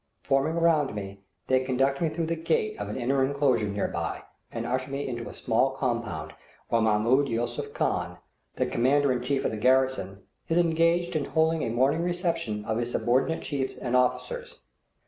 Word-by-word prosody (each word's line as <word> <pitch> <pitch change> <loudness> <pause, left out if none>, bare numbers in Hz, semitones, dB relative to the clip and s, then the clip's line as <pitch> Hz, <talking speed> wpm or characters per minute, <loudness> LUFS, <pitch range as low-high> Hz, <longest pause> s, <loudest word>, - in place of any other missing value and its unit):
Forming 135 +4 +1
around 155 -7 +2
me, 100 -1 -6 0.3
they 130 0 +3
conduct 135 +2 +1
me 165 - +2
through 165 +1 -2
the 165 +1 -1
gate 430 - 0
of - - -4
an - - -4
inner 130 +2 +1
enclosure 135 -5 +2
near 100 0 -1
by, - - -4 0.3
and - - -4
usher 130 +2 -2
me 140 +1 -3
into 120 -2 -4
a - - -9
small 115 +4 +2
compound 115 - -3 0.4
where 115 - +2
Mahmoud 110 +6 +3
Yusuph 115 +1 -2
Khan, - - -1 0.4
the - - +1
commander 140 +3 +2
in 125 -1 0
chief 135 +2 -1
of - - +1
the 110 - -4
garrison, 125 -5 +1 0.2
is 165 0 +1
engaged 170 0 +2
in 150 -3 0
holding 160 0 +1
a 120 - -1
morning 135 +7 +2
reception 170 - -1
of 110 0 -1
his 120 0 -2
subordinate 125 +9 +1
chiefs 135 -3 -2
and 125 -1 -2
officers. 485 - 0
130 Hz, 185 wpm, -27 LUFS, 120-160 Hz, 0.4 s, they